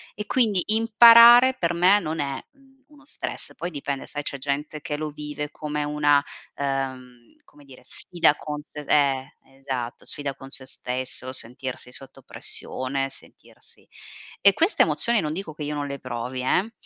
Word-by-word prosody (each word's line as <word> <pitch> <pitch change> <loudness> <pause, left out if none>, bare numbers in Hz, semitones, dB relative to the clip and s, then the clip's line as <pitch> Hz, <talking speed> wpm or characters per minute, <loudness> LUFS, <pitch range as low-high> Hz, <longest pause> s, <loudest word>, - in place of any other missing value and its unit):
e 210 - -6
quindi 215 -7 +1
imparare 235 +3 +7
per 170 0 -1
me 185 +4 +4
non 160 -4 -4
è, 140 -2 -3
mhmm, 270 -1 -27
uno 295 -1 -20
stress, 295 - -6
poi 175 - -4
dipende, 140 -4 -5
sai 145 0 -6
c'è 140 - -4
gente 145 +3 -4
che 150 0 -5
lo 155 +1 -4
vive 150 0 -7
come 150 -1 -4
una, 145 -1 +2 0.3
ehm, 130 -3 -5
come 145 -1 -21
dire 130 -2 -15
sfida 170 -4 +2
con 150 -1 -6
se 150 0 -11
eh, 135 -3 +1 0.2
esatto, 130 -3 -6
sfida 145 -2 +2
con 135 0 -12
se 130 -1 0
stesso, 130 0 -4
sentirsi 125 0 -2
sotto 135 +1 -8
pressione, 135 +1 -3
sentirsi - - -15 0.6
e 200 - +6
queste 335 - +3
emozioni 235 -2 +4
non 150 -2 -2
dico 170 -3 -6
che 150 - -8
io 150 +1 -4
non 145 -1 -3
le 140 0 -6
provi 125 0 -5
eh, 185 - 0
145 Hz, 165 wpm, -24 LUFS, 135-180 Hz, 0.6 s, imparare